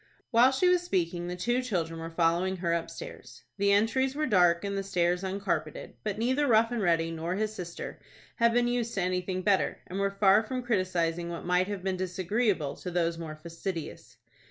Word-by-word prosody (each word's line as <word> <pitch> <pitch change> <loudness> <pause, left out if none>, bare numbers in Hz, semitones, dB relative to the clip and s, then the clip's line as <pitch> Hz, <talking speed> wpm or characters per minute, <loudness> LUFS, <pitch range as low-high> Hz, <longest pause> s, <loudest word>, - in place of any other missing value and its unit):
While 240 +2 +6
she 270 +7 +2
was 360 -1 +4
speaking, 175 - -1
the 180 - -3
two 240 +8 0
children 170 -9 -2
were 165 0 -5
following 170 +3 +1
her 170 -1 0
upstairs. 170 - -6 0.2
The 200 0 +3
entries 260 +6 +2
were 305 +1 0
dark, 175 - +3
and 200 0 -2
the 195 - -1
stairs 180 -1 0
uncarpeted, 185 -5 -3
but 210 -2 -2
neither 260 +6 +1
Rough 230 -1 +4
and 240 -2 -1
Ready 165 -3 +2
nor 165 +2 -3
his 215 +1 -1
sister 175 -4 -7 0.4
had 235 -1 +4
been 240 +1 +2
used 240 -1 -1
to 195 - 0
anything 185 0 -1
better, 195 0 +2
and 190 +2 -5
were 200 0 +2
far 200 +1 +6
from 250 +3 -4
criticising 175 -6 0
what 170 -1 -6
might 180 +1 +2
have 200 -3 -5
been 190 -1 -1
disagreeable 185 - 0
to 180 - -6
those 170 -1 0
more 155 -2 -6
fastidious. 165 +1 -7
185 Hz, 195 wpm, -29 LUFS, 170-220 Hz, 0.4 s, While